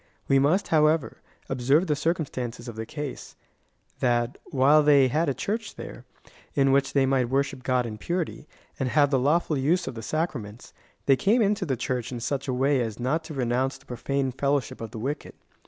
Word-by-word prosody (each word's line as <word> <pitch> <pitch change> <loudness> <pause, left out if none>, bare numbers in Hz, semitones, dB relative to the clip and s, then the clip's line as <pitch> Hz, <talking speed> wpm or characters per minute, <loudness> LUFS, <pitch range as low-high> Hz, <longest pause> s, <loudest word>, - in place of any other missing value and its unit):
We 135 - +4
must, 155 +9 +2
however, 155 -1 +2 0.3
ob 125 - -4
serve 140 +8 +4
the 150 -4 +1
circumstances 135 -7 -3
of 120 - -7
the 110 0 -5
case 145 -3 -6 0.3
— - - -41
that, 120 -1 0
while 140 +3 +4
they 140 -3 +5
had 155 +4 +1
a - - +1
Church 220 +2 -3
there, - - -9 0.5
in 135 -1 +3
which 135 0 +2
they 135 -1 +4
might 130 -2 +1
worship 135 0 0
God 125 -1 +1
in 110 -2 -6
purity, 170 - -3 0.3
and 130 -2 0
haA^e 145 +1 +3
the 135 - +3
lawful 150 +2 +1
use 170 +7 +1
of - - -3
the 115 - -7
sacraments, 120 -6 -4 0.3
they 135 - +5
came 215 - +3
into 200 -2 0
the 130 -3 0
Church 125 +1 -3
in 120 - -4
such 140 +4 -3
a 130 - 0
way 135 +1 +2
as 115 -1 -4
not 140 +7 0
to 155 - -7
renounce 130 +1 0
the - - -23
profane 135 +2 -2
fellowship 140 0 -1
of 115 - -5
the - - -9
wicked. 140 +7 -4
135 Hz, 205 wpm, -26 LUFS, 125-150 Hz, 0.5 s, they